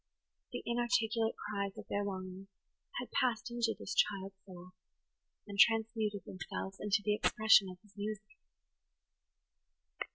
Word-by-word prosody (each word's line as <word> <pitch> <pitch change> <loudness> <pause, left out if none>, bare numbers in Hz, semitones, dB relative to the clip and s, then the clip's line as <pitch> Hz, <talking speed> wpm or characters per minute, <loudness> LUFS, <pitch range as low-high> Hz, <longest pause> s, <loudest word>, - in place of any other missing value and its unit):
The - - -5
inarticulate 235 -2 +1
cries 200 -1 -3
of - - -7
their 205 - -1
longings 190 -1 -5 0.5
had 245 - -6
passed 245 -3 +1
into 235 -2 0
this - - -5
child's 195 -1 +1
soul, 180 -1 -11 0.7
and 200 -1 -7
transmuted 220 -3 +3
themselves 190 +1 -6
into 210 0 +1
the 210 - +3
expression 215 -2 +5
of 185 - -9
his 210 -1 -22
music. 215 +5 -6
210 Hz, 125 wpm, -34 LUFS, 195-225 Hz, 0.7 s, expression